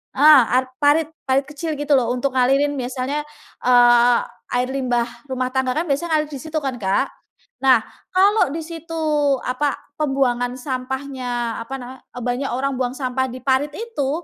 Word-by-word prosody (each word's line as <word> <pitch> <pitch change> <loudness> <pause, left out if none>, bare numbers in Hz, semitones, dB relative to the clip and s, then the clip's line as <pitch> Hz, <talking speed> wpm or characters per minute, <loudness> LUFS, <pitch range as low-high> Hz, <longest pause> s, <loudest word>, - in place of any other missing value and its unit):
eh, 295 0 +8 0.2
ar 260 0 -6
parit-parit 290 -2 +2
kecil 310 +2 -4
gitu 290 0 +1
loh 240 -3 +1
untuk 255 +1 -1
ngalirin 275 +3 +3
misalnya, 260 +3 -3 0.4
eee, 245 -1 +6 0.4
air 250 +1 +1
limbah 250 -3 0 0.3
rumah 255 0 -1
tangga 265 -1 +1
kan 330 - 0
biasanya 315 +3 +1
ngalir 305 0 -2
di 275 - -5
situ 315 0 -4
kan, 270 -3 -2
Kak. 190 0 +1 0.6
Nah, 260 -3 +6 0.4
kalau 400 -3 +4
di - - -2
situ 330 0 -8 0.5
apa, 275 +3 0 0.2
pembuangan 250 -4 0
sampahnya, 255 -2 -3
apa 245 +4 -6
nama, 250 +1 -9 0.2
banyak 245 +3 -2
orang 270 +3 -1
buang 250 0 -1
sampah 260 -1 -1
di 255 - -7
parit 275 +2 +1
itu 445 - -3
265 Hz, 155 wpm, -21 LUFS, 250-290 Hz, 0.6 s, eh